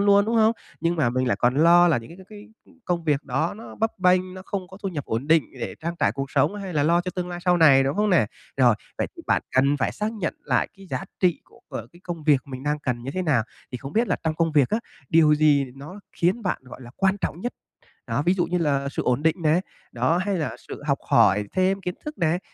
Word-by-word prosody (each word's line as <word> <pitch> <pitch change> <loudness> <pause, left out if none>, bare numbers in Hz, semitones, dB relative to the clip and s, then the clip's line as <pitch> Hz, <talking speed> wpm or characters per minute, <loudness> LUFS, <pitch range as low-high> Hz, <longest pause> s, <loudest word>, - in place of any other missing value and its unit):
luôn, 200 0 +5
đúng 230 +2 -1
không? 220 0 +5 0.3
Nhưng 170 +1 0
mà 145 -7 +2
mình 130 0 0
lại - - +1
còn 125 +1 +2
lo 170 +4 +6
là 155 -7 +3
những 115 +9 -11
c 190 - -14
c - - -39
cái 210 +1 -12 0.4
công 175 -2 -1
việc 150 -2 +1
đó 145 +6 -1
nó 225 - -10
bấp 225 -2 -2
bênh, 185 0 +2
nó 185 - -9
không 185 -3 -4
có 190 - -12
thu 195 - -1
nhập 150 -7 -5
ổn 115 +5 -3
định 160 -2 +4 0.2
để - - -4
trang 170 +1 -2
trải - - +2
cuộc 135 0 -5
sống 140 +8 +2
hay 195 -3 -6
là 150 -3 +1
lo 170 +3 +3
cho 180 +1 -4
tương 180 -1 -3
lai 175 - -5
sau 180 -1 +4
này, 140 -5 +6
đúng 140 +6 -1
không 210 0 +2
nè? 160 - +4 0.3
Rồi, 125 -4 +5 0.2
vậy - - 0
thì - - -10
bạn - - +2
cần 140 +2 +4
phải 120 -5 -1
xác 215 +2 -3
nhận 195 -7 -3
lại 125 -4 +1
cái 195 0 -14
giá - - -3 0.2
trị 180 -3 +2
của, - - -22
ờ, - - -6
cái 175 - -18
công 170 -4 -6
việc 145 -4 +4
mình 130 -2 -8
đang 150 +1 -1
cần 125 -5 -3
như 135 - -4
thế 185 +6 -2
nào. 145 -10 +2 0.3
Thì 125 - -4
không 135 +3 -8
biết 235 +2 +1
là - - +1
trong 155 -1 0
công 165 0 0
việc 145 -4 +4
á, 220 - +2 0.3
điều 155 -2 +5
gì 150 -2 +4
nó 155 +9 -10
khiến 190 +7 0
bạn, 185 -7 -2
gọi 130 - -11
là, 120 - -11
quan 195 0 +2
trọng 170 - -3
nhất? 245 +5 -3 0.6
Đó, - - 0
ví 180 - +4
dụ 180 -2 0
như 180 +1 -1
là 140 -4 0
sự - - -3
ổn 125 +4 0
định 160 0 +3
này, 160 +3 +3 0.3
đó, 130 +8 +1
hay 190 0 -1
là 155 - -3
sự - - -8
học 140 -2 +1
hỏi 105 +1 +4
thêm 190 +1 +1
kiến 180 -1 -3
thức 300 -1 -6
này, 170 0 +1
165 Hz, 275 wpm, -24 LUFS, 140-185 Hz, 0.6 s, lo